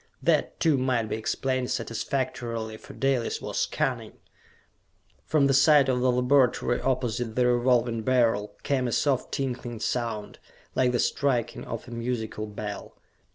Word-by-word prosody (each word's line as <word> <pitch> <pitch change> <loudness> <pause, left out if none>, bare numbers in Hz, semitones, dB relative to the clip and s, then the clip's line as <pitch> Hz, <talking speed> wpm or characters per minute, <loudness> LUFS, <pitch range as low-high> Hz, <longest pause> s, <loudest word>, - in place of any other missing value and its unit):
That, - - +1
too, 155 -5 +3
might 125 -4 0
be - - -1
explained 130 +3 -1
satisfactorily, 115 -1 -3
for - - -13
Dalis 135 -3 0
was - - -2
cunning. - - -2 1.1
From 150 -3 +3
the 135 - +3
side 140 0 +5
of 125 -1 +1
the 125 0 +3
laboratory 125 -1 +2
opposite 120 -3 -1
the 125 - +3
Revolving 120 -1 +2
Beryl 115 -4 +1
came 130 -3 0
a - - -2
soft 135 +1 0
tinkling 125 -4 -3
sound, 115 -3 -3 0.3
like 125 -1 +2
the 120 - +1
striking 120 -3 0
of 115 +1 -6
a - - -10
musical 115 -2 -3
bell. 105 0 -7
125 Hz, 145 wpm, -27 LUFS, 115-130 Hz, 1.1 s, side